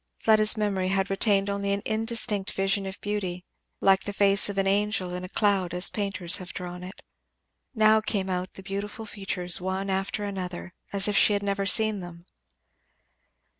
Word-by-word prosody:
Fleda's 215 Hz, 0 st, +4 dB
memory 200 Hz, -3 st, 0 dB
had 195 Hz, +1 st, 0 dB
retained 195 Hz, 0 st, +2 dB
only 200 Hz, 0 st, -2 dB
an 200 Hz, -, -3 dB
indistinct 220 Hz, -3 st, -1 dB
vision 195 Hz, 0 st, 0 dB
of 190 Hz, -, -8 dB
beauty, 185 Hz, -3 st, -3 dB, 0.4 s
like 190 Hz, -1 st, +4 dB
the 205 Hz, -, -4 dB
face 200 Hz, 0 st, +4 dB
of 200 Hz, -, -5 dB
an 195 Hz, -, +2 dB
angel 200 Hz, -2 st, 0 dB
in 180 Hz, 0 st, -5 dB
a 185 Hz, -, -7 dB
cloud 195 Hz, -4 st, +1 dB
as 180 Hz, +2 st, +2 dB
painters 195 Hz, -4 st, -1 dB
have 185 Hz, -3 st, -9 dB
drawn 180 Hz, 0 st, -6 dB
it; 185 Hz, +2 st, -10 dB, 0.7 s
now 220 Hz, 0 st, +5 dB
came 210 Hz, -3 st, -2 dB
out 185 Hz, 0 st, -3 dB
the 195 Hz, -, -10 dB
beautiful 205 Hz, +3 st, -5 dB
features 190 Hz, -4 st, -4 dB
one 190 Hz, +1 st, -2 dB
after 195 Hz, +2 st, -2 dB
another, 185 Hz, -2 st, -5 dB, 0.2 s
as 200 Hz, 0 st, +4 dB
if 205 Hz, -, 0 dB
she 210 Hz, -, +5 dB
had 200 Hz, 0 st, -1 dB
never 200 Hz, 0 st, -1 dB
seen 215 Hz, -1 st, +4 dB
them. 175 Hz, -1 st, -10 dB
195 Hz, 175 wpm, -26 LUFS, 185-205 Hz, 0.7 s, now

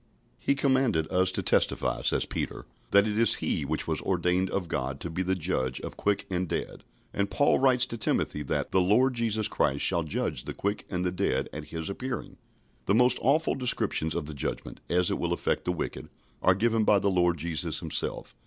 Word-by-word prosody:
" -, -, -37 dB
"He 140 Hz, -, +5 dB
commanded 130 Hz, -, +2 dB
us 95 Hz, 0 st, +3 dB
to -, -, -2 dB
testify," -, -, +1 dB
says -, -, +1 dB
Peter, -, -, -4 dB, 0.2 s
"that 100 Hz, +1 st, +5 dB
it 105 Hz, +1 st, -1 dB
is 115 Hz, -, +4 dB
he 75 Hz, -, -1 dB
which 75 Hz, +2 st, -2 dB
was -, -, -1 dB
ordained 90 Hz, +1 st, +1 dB
of 95 Hz, -2 st, -2 dB
God 65 Hz, -1 st, -3 dB
to 85 Hz, -, -4 dB
be 90 Hz, -, -2 dB
the 95 Hz, +1 st, 0 dB
Judge 70 Hz, -8 st, -1 dB
of -, -, -7 dB
quick 100 Hz, -1 st, 0 dB
and 90 Hz, -2 st, -2 dB
dead." -, -, -4 dB, 0.3 s
And 100 Hz, 0 st, -1 dB
Paul 145 Hz, -, +3 dB
writes 130 Hz, -2 st, +4 dB
to 115 Hz, -, -6 dB
Timothy 75 Hz, -, 0 dB
that 70 Hz, -, -2 dB
"the 95 Hz, -, +3 dB
Lord 120 Hz, +8 st, +3 dB
Jesus 110 Hz, -3 st, 0 dB
Christ 70 Hz, +1 st, 0 dB
shall 85 Hz, -2 st, +2 dB
judge 80 Hz, -2 st, -2 dB
the -, -, -6 dB
quick 100 Hz, +1 st, -3 dB
and 90 Hz, -1 st, -2 dB
the 90 Hz, -, +1 dB
dead 95 Hz, +2 st, -1 dB
at -, -, -6 dB
his 80 Hz, -1 st, -5 dB
appearing." 120 Hz, +4 st, -5 dB, 0.5 s
The 100 Hz, -, +3 dB
most 125 Hz, +1 st, +4 dB
awful 150 Hz, +5 st, +2 dB
descriptions 120 Hz, -, -1 dB
of -, -, -2 dB
the 75 Hz, -, -6 dB
Judgment, 70 Hz, -, -4 dB
as 90 Hz, 0 st, +2 dB
it -, -, -1 dB
will 85 Hz, 0 st, 0 dB
affect -, -, -1 dB
the 90 Hz, -, +1 dB
wicked, 90 Hz, -, -5 dB, 0.3 s
are 95 Hz, -, +4 dB
given 115 Hz, +2 st, +2 dB
by 105 Hz, -1 st, +5 dB
the 100 Hz, 0 st, +1 dB
Lord 90 Hz, -2 st, +2 dB
Jesus 80 Hz, 0 st, -1 dB
Himself. -, -, -2 dB
95 Hz, 210 wpm, -28 LUFS, 85-115 Hz, 0.5 s, He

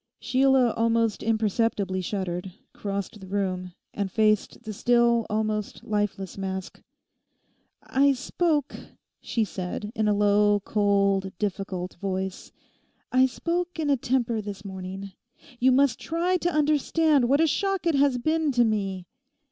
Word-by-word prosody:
Sheila 260 Hz, -2 st, +3 dB
almost 230 Hz, -1 st, +1 dB
imperceptibly 215 Hz, -3 st, 0 dB
shuddered, 185 Hz, -1 st, -4 dB, 0.2 s
crossed 200 Hz, +1 st, -4 dB
the 190 Hz, -, -11 dB
room, 185 Hz, -2 st, -2 dB, 0.2 s
and 200 Hz, -2 st, -3 dB
faced 215 Hz, +2 st, +1 dB
the 215 Hz, -2 st, -6 dB
still, 235 Hz, +1 st, +3 dB
almost 215 Hz, -1 st, -2 dB
lifeless 205 Hz, -3 st, -2 dB
mask. 190 Hz, -1 st, -5 dB, 1.0 s
'I 275 Hz, +1 st, +3 dB
spoke,' 295 Hz, +2 st, -1 dB, 0.5 s
she 230 Hz, -, -1 dB
said, 195 Hz, +2 st, -5 dB
in 220 Hz, -4 st, 0 dB
a 210 Hz, -, +3 dB
low, 205 Hz, 0 st, +3 dB
cold, 200 Hz, -2 st, +2 dB
difficult 195 Hz, -3 st, -3 dB
voice—'I 190 Hz, +6 st, -3 dB
spoke 345 Hz, +7 st, -3 dB
in 305 Hz, -3 st, 0 dB
a -, -, +5 dB
temper 240 Hz, -3 st, 0 dB
this 200 Hz, -1 st, -8 dB
morning. 190 Hz, 0 st, -7 dB, 0.5 s
You 260 Hz, +2 st, +4 dB
must 270 Hz, -1 st, +3 dB
try 345 Hz, +3 st, 0 dB
to 350 Hz, -, 0 dB
understand 300 Hz, -2 st, +2 dB
what 280 Hz, +2 st, +4 dB
a 325 Hz, -, +5 dB
shock 390 Hz, +3 st, 0 dB
it 335 Hz, -, +3 dB
has 280 Hz, -2 st, +3 dB
been 315 Hz, +3 st, +1 dB
to 240 Hz, -1 st, +4 dB
me. 195 Hz, -4 st, -2 dB
215 Hz, 130 wpm, -26 LUFS, 195-265 Hz, 1.0 s, a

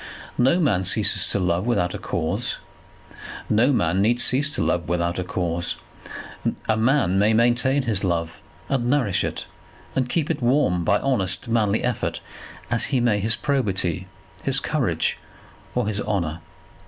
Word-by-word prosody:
No 135 Hz, +8 st, +4 dB
man 125 Hz, -, +2 dB
ceases 105 Hz, +3 st, +3 dB
to -, -, +2 dB
love 90 Hz, +2 st, 0 dB
without 90 Hz, -7 st, +1 dB
a -, -, -5 dB
cause. 90 Hz, +8 st, -2 dB, 0.9 s
No 115 Hz, +6 st, +4 dB
man 90 Hz, -6 st, +1 dB
need 120 Hz, +4 st, +2 dB
cease 140 Hz, +4 st, +3 dB
to -, -, 0 dB
love 85 Hz, -2 st, -1 dB
without 85 Hz, 0 st, -1 dB
a -, -, -1 dB
cause. 85 Hz, -1 st, -1 dB, 0.9 s
A 110 Hz, -, +2 dB
man 110 Hz, -4 st, +2 dB
may 105 Hz, +2 st, +3 dB
maintain 120 Hz, +4 st, +2 dB
his 110 Hz, -6 st, 0 dB
love, 85 Hz, -3 st, -2 dB, 0.3 s
and 125 Hz, -3 st, 0 dB
nourish 120 Hz, -10 st, +1 dB
it, -, -, -4 dB, 0.5 s
and 130 Hz, -2 st, 0 dB
keep 160 Hz, 0 st, 0 dB
it -, -, -3 dB
warm 120 Hz, -9 st, +2 dB
by 100 Hz, +3 st, +3 dB
honest 95 Hz, -9 st, 0 dB
manly 110 Hz, -2 st, +1 dB
effort, 125 Hz, -2 st, -2 dB, 0.5 s
as -, -, +3 dB
he 130 Hz, -, 0 dB
may 120 Hz, -4 st, +2 dB
his 110 Hz, +3 st, +2 dB
probity, 95 Hz, -, -1 dB, 0.3 s
his -, -, +1 dB
courage, -, -, -1 dB, 0.6 s
or -, -, +1 dB
his 105 Hz, -1 st, -2 dB
honour. 85 Hz, -6 st, -2 dB
105 Hz, 155 wpm, -23 LUFS, 90-125 Hz, 0.9 s, No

